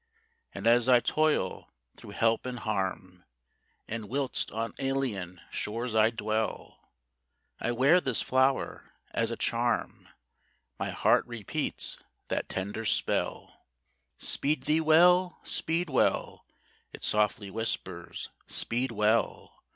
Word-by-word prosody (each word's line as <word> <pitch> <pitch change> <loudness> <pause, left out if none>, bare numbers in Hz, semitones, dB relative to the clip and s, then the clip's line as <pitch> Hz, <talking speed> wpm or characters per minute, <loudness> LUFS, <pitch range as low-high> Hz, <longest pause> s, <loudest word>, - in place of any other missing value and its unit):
And - - -7
as 120 +2 +4
I 125 -1 +7
toil 155 +5 0 0.2
through 100 - -11
help 115 +2 +2
and 125 -1 -4
harm, 95 -4 -3 0.6
And 110 -2 -5
whilst 135 0 -1
on 115 +1 -3
alien 120 -10 -2
shores 115 +2 -3
I 110 0 +5
dwell, 110 -1 -3 0.8
I 120 - -1
wear 140 +9 +4
this 130 -7 0
flower 130 +1 0 0.2
as - - +1
a - - -4
charm, - - -1 0.7
My - - -2
heart - - +3
repeats 120 -5 -2 0.3
that - - -2
tender 100 +4 -3
spell: - - -1 0.6
"Speed 145 -2 -1
thee 155 +3 +2
well! 175 +3 +5
Speed 165 +2 -1
well!" 130 -4 0 0.4
It - - -11
softly 105 -1 +1
whispers, 95 -5 -4 0.2
"Speed 125 +3 +2
well! 110 0 0
115 Hz, 115 wpm, -29 LUFS, 105-135 Hz, 0.8 s, I